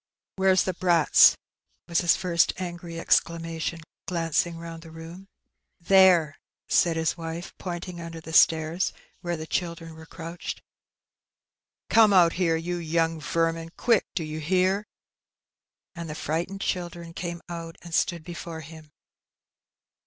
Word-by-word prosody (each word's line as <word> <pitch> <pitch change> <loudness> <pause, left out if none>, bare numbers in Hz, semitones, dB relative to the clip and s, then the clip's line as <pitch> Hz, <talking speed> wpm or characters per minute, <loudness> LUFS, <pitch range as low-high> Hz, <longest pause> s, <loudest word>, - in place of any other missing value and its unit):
" - - -67
Where's 190 -1 +4
the 185 - -2
brats? 175 -3 +5 0.3
" - - -47
was 170 -1 +1
his 175 -2 +3
first 170 -3 +2
angry 175 -2 -6
exclamaticm, 165 0 0 0.3
icung 165 -1 0
round 165 0 -8
the 165 - -12
room. 165 +1 -9
18 175 - -10
Heb - - -12
Benny. 195 - -17 0.6
"There," 185 -6 +6 0.3
said 170 -2 +3
hia 160 - -1
wife, 165 +1 -6
pointing 175 -1 -6
under 165 0 -7
the 160 0 -10
stairs, 160 +3 +3 0.3
where 175 -1 -2
the 155 - -6
children 170 -1 -3
were 160 0 -13
crouched, 165 +1 -7 0.7
" - - -67
Come 220 -2 +6
out 175 -3 +6
here, 170 -3 +1
you 175 +2 -3
young 165 -1 0
vermin; 165 +1 -1
quick 230 -4 +3
1 - - -67
do 170 - -1
you 155 0 -5
hear?" 185 +5 +1 1.1
And 170 -2 -7
the 150 - -5
frightened 170 +6 -3
children 170 -2 -4
came 170 0 -5
out 165 -1 -7
and 170 -1 -10
stood 170 +2 0
before 170 -2 -7
him. 155 0 -12
170 Hz, 155 wpm, -26 LUFS, 165-175 Hz, 1.1 s, There